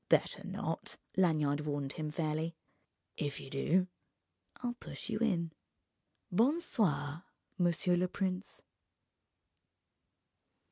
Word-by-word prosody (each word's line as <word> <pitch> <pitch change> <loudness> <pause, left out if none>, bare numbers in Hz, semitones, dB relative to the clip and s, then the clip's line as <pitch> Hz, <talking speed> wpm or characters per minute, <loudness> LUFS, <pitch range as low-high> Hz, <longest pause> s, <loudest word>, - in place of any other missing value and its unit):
"Better - - +3
not," - - -3 0.2
Lanyard 150 -5 +3
warned 145 -2 -2
him 155 -1 -3
fairly, 155 +1 -1 0.6
"if 145 -1 -1
you 135 - -9
do, 180 +7 +3 0.7
I'll 245 -1 -2
push 240 - -8
you 215 - 0
in... 175 -8 +2 0.8
Bon 250 - +4
soir, 170 - +1 0.4
monsieur 175 0 +4
le 180 +1 +3
prince!" 185 +1 -2
170 Hz, 100 wpm, -34 LUFS, 150-190 Hz, 0.8 s, Bon